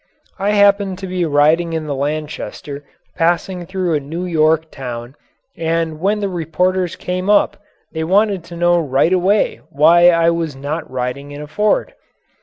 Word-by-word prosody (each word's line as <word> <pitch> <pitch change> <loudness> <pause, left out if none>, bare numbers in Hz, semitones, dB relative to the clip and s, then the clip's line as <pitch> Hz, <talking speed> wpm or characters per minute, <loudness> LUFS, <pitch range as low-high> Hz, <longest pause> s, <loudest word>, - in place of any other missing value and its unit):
I 200 +2 +1
happened 200 -2 +3
to 190 - -7
be 180 -1 -1
riding 160 +3 +2
in 160 -1 -2
the 145 - -3
Lanchester 145 0 -4 0.3
passing 175 +1 0
through 185 -3 -1
a 150 - +2
New 160 +6 -5
York 160 -1 +1
town 125 -1 -7 0.4
and 165 -1 -1
when 205 +4 0
the 200 - 0
reporters 180 +1 -1
came 185 +2 -3
up 205 -1 +3 0.3
they 160 -1 -3
wanted 195 +1 +2
to 170 0 -10
know 175 0 +3
right 145 +3 +1
away 190 +3 +1
why 170 +5 +6
I 165 -1 +3
was 165 -4 -2
not 145 +4 -5
riding 130 +2 -4
in 145 0 -8
a 150 - -6
Ford. 210 +8 0
165 Hz, 165 wpm, -18 LUFS, 150-185 Hz, 0.4 s, why